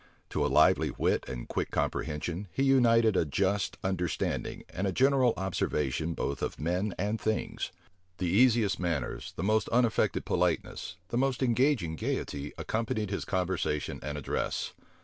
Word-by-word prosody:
To -, -, 0 dB
a -, -, +3 dB
lively -, -, +5 dB
wit -, -, 0 dB
and -, -, -5 dB
quick -, -, -2 dB
comprehension, 85 Hz, +6 st, -2 dB
he 135 Hz, -, 0 dB
united 115 Hz, -5 st, +5 dB
a -, -, +4 dB
just 95 Hz, +6 st, 0 dB
understanding 90 Hz, -3 st, -2 dB
and 95 Hz, +3 st, -2 dB
a -, -, +1 dB
general 130 Hz, +3 st, +3 dB
observation 80 Hz, -4 st, -1 dB
both 70 Hz, -, -2 dB
of -, -, -3 dB
men 90 Hz, +5 st, -1 dB
and 105 Hz, +3 st, -1 dB
things. 110 Hz, 0 st, -2 dB, 0.5 s
The 90 Hz, -, -2 dB
easiest 110 Hz, +2 st, +4 dB
manners, 85 Hz, -7 st, -2 dB
the 80 Hz, -, -3 dB
most 110 Hz, +2 st, +2 dB
unaffected 120 Hz, -1 st, +2 dB
politeness, 90 Hz, -, -1 dB
the 120 Hz, -, 0 dB
most 135 Hz, -1 st, +1 dB
engaging 120 Hz, -, +2 dB
gayety, 70 Hz, -1 st, -3 dB
accompanied 110 Hz, -2 st, -2 dB
his 100 Hz, -, -2 dB
conversation 90 Hz, -6 st, -1 dB
and 75 Hz, +1 st, -4 dB
address. 75 Hz, -, -2 dB
95 Hz, 150 wpm, -30 LUFS, 85-115 Hz, 0.5 s, lively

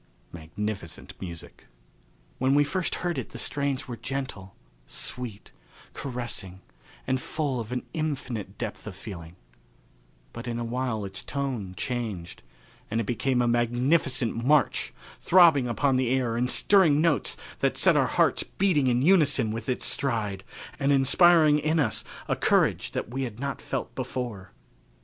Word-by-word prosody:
Magnificent 85 Hz, +2 st, -6 dB
Music. 85 Hz, -3 st, -9 dB, 0.7 s
When 130 Hz, +2 st, +3 dB
we 145 Hz, -, +5 dB
first 180 Hz, +5 st, -1 dB
heard 175 Hz, -1 st, 0 dB
it -, -, -6 dB
the -, -, -9 dB
strains 140 Hz, -2 st, -1 dB
were 120 Hz, -, -5 dB
gentle, 120 Hz, -6 st, -5 dB, 0.3 s
sweet, 120 Hz, -5 st, -6 dB, 0.4 s
caressing 120 Hz, -8 st, -5 dB, 0.4 s
and 130 Hz, 0 st, 0 dB
full 140 Hz, -5 st, -2 dB
of 115 Hz, 0 st, -6 dB
an 125 Hz, 0 st, -3 dB
infinite 125 Hz, -, -3 dB
depth 110 Hz, -1 st, -5 dB
of 100 Hz, -, -6 dB
feeling, 85 Hz, -4 st, -9 dB, 1.0 s
but 115 Hz, +2 st, -7 dB
in 120 Hz, -1 st, -2 dB
a 120 Hz, -, -2 dB
little 115 Hz, 0 st, -5 dB
while 125 Hz, -5 st, -1 dB
its 95 Hz, -1 st, 0 dB
tone 125 Hz, -10 st, -4 dB
changed, 110 Hz, -9 st, -4 dB, 0.5 s
and 115 Hz, -, 0 dB
it 115 Hz, -, -1 dB
became 125 Hz, +3 st, +1 dB
a -, -, +1 dB
magnificent 120 Hz, +2 st, +2 dB
march, 145 Hz, -1 st, +2 dB, 0.3 s
throbbing 165 Hz, -8 st, +6 dB
upon 130 Hz, +2 st, +1 dB
the 130 Hz, -2 st, +1 dB
air 125 Hz, -3 st, +1 dB
in 125 Hz, +2 st, +1 dB
stirring 165 Hz, 0 st, +4 dB
notes 160 Hz, -3 st, +1 dB, 0.2 s
that -, -, +1 dB
set -, -, +5 dB
our -, -, +3 dB
hearts -, -, +2 dB
beating 175 Hz, -9 st, +1 dB
in 125 Hz, 0 st, +2 dB
unison 150 Hz, -, +4 dB
with 115 Hz, +3 st, -5 dB
its 125 Hz, -, -1 dB
stride 105 Hz, -8 st, 0 dB, 0.4 s
and 140 Hz, 0 st, +2 dB
inspiring 150 Hz, +3 st, +5 dB
in 155 Hz, +2 st, +1 dB
us 145 Hz, -, 0 dB, 0.2 s
a -, -, +1 dB
courage -, -, +2 dB
that -, -, -3 dB
we 130 Hz, +3 st, -3 dB
had 120 Hz, -4 st, -4 dB
not 140 Hz, +1 st, -4 dB
felt 135 Hz, -3 st, -4 dB
before. 120 Hz, -7 st, -5 dB
125 Hz, 155 wpm, -27 LUFS, 110-140 Hz, 1.0 s, throbbing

